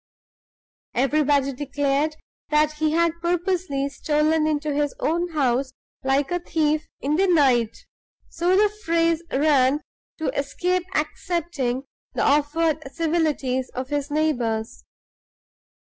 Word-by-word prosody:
Everybody 275 +1 +2
declared 285 +2 -1 0.3
that 300 0 +3
he 305 0 0
had 335 0 +1
purposely 345 -5 0
stolen 305 +2 +1
into 300 -1 -1
his 290 0 0
own 345 +3 0
house 265 -2 +1 0.3
like 270 +2 +1
a 355 - +1
thief 310 -2 0
in 295 +3 0
the 390 +2 +3
night 260 -10 +2 0.4
(so 355 +3 +1
the 420 +1 +5 0.2
phrase 330 -1 +2
ran) 280 0 +3 0.4
to 315 - -2
escape 355 +6 -1
accepting 300 -5 -2 0.3
the - - 0
offered 300 0 +1
civilities 305 -6 0
of 255 +1 -4
his 290 0 -2
neighbors. 245 -8 -1
300 Hz, 115 wpm, -23 LUFS, 275-330 Hz, 0.4 s, the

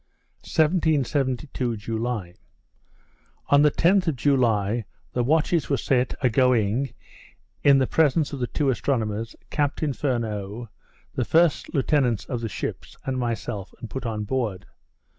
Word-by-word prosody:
1772 140 -6 0
July 110 -3 -3 1.2
On 145 0 +6
the 150 - +6
10th 180 +5 +3
of 160 - +1
July 115 -5 +2 0.3
the 125 - +1
watches 160 +4 +2
were 140 - +2
set 125 +1 +1
a 130 - +4
going 125 0 +2 0.7
in 140 -1 +6
the 135 - +3
presence 155 +1 +2
of 140 - -4
the 125 - -1
two 140 0 +1
astronomers, 115 -3 -2 0.2
Captain 145 0 0
Furneaux, 115 -4 -3 0.4
the - - 0
first 165 -1 +2
lieutenants 135 -6 +1
of 125 -3 -4
the 115 - -3
ships, - - -6
and 130 -1 -1
myself, 110 -4 -4
and 115 - -8
put 130 -2 -4
on 110 -2 -2
board. 110 -4 -2
125 Hz, 135 wpm, -25 LUFS, 115-145 Hz, 1.2 s, On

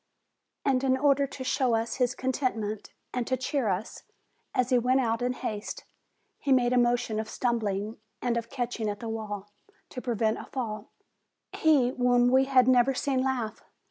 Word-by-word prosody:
And, 265 -1 +2
in 260 -1 +3
order 280 0 +3
to 265 -1 -7
show 255 -2 +1
us 225 0 -2
his 250 -1 +1
contentment, 240 -6 -2 0.2
and 250 -2 -2
to 260 - +1
cheer 260 -1 -1
us, 195 +3 -3 0.5
as 255 0 0
he 250 - +5
went 255 +2 +2
out 230 -2 0
in 250 +1 0
haste, 215 -4 -5 0.6
he 280 - -2
made 250 -1 +4
a - - +3
motion 240 -2 +1
of 220 - -4
stumbling 215 -3 -1 0.2
and 245 -1 0
of 230 0 -3
catching 240 -4 -2
at 205 - -4
the 230 - -6
wall, 205 -2 -5 0.4
to 250 - -6
prevent 225 -3 0
a - - -8
fall; 215 -5 -5 0.6
he 290 -6 +4
whom 245 -1 +3
we 265 +1 +5
had 260 -2 +4
never 255 +1 +4
seen 265 -1 0
laugh! 255 -4 -2
245 Hz, 175 wpm, -28 LUFS, 225-260 Hz, 0.6 s, he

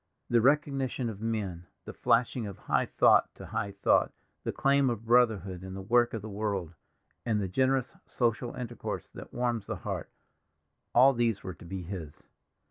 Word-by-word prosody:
The 120 -1 +5
recognition 135 -3 +1
of 100 -1 -11
men, 100 -7 -3 0.2
the - - -7
flashing 115 -1 +1
of 100 - -8
high - - 0
thought - - +4
to - - -10
high 100 - -3
thought, 100 - +3 0.3
the - - -1
claim 140 -1 +3
of 115 -2 -4
brotherhood 110 -6 +2
in 95 0 -7
the 95 - -5
work 120 +3 +3
of 110 - -5
the - - -5
world, 100 -5 -3 0.5
and 110 -3 +1
the 100 - -1
generous 130 +6 +1
social 120 0 -1
intercourse 120 -2 -5
that - - -10
warms 120 -3 -1
the - - -2
heart—all 135 +3 -1
these 115 -4 0
were 95 - -5
to 85 - -14
be 90 +1 -5
his. 85 -5 -7
115 Hz, 170 wpm, -29 LUFS, 95-125 Hz, 0.5 s, The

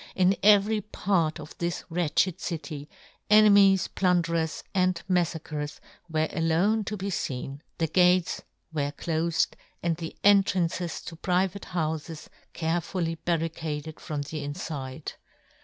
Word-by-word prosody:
In 185 +1 +4
every 210 +1 +5
part 175 -6 0
of 150 0 -10
this 170 0 -2
wretched 165 +1 +1
city, 150 -3 -5 0.4
enemies, 200 -3 +6
plun 180 -2 +2
derers, 165 -1 -2
and 185 -2 +2
mafTacrers, 160 -4 -1 0.3
were 155 0 +1
alone 175 +7 +2
to 210 - -3
be 195 +1 -3
feen; 135 -3 -3 0.2
the 165 - +1
gates 180 +2 +3 0.3
were 145 -2 -1
clofed, 165 +1 0 0.3
and 170 -2 +1
the 165 -2 -7
entrances 185 -4 +3
to 165 - -8
private 185 +3 0
houfes 160 -1 -3 0.2
care 165 +1 0
fully 165 -1 -2
barricaded 160 -2 -3
from 150 -4 -4
the 150 +1 -5
infide. 145 -2 -5
170 Hz, 125 wpm, -27 LUFS, 155-185 Hz, 0.4 s, enemies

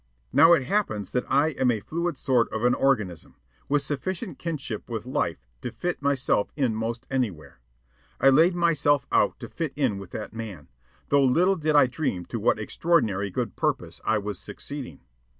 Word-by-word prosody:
Now 165 +1 +7
it 165 - +3
happens 125 - -1
that 125 - -2
I 140 +4 +4
am 130 -4 +1
a 115 -3 +1
fluid 170 +10 -3
sort 125 -3 +2
of 110 +1 -3
an 125 0 +4
organism, 110 -13 0 0.3
with 145 0 +2
sufficient 180 - -4
kinship 145 -11 -5
with 110 -2 -4
life 95 - -2 0.2
to 120 - -4
fit 175 +9 -3
myself 135 -7 +1
in 130 -6 +1
'most 115 +3 -3
anywhere. 105 - -3 0.6
I 135 - +6
laid 165 +6 +5
myself 155 -5 +2
out - - +2
to - - -6
fit - - -4
in 100 - 0
with 100 - -9
that 110 - -6
man, 105 -10 -7 0.4
though 140 -1 +4
little 175 +9 +3
did 155 -3 0
I 145 - +7
dream 125 - -2
to - - -1
what - - +2
extraordinary 110 - +1
good 110 0 -3
purpose - - -2
I 110 - +2
was 105 -2 -4
succeeding. 135 - -7
130 Hz, 180 wpm, -26 LUFS, 110-155 Hz, 0.6 s, Now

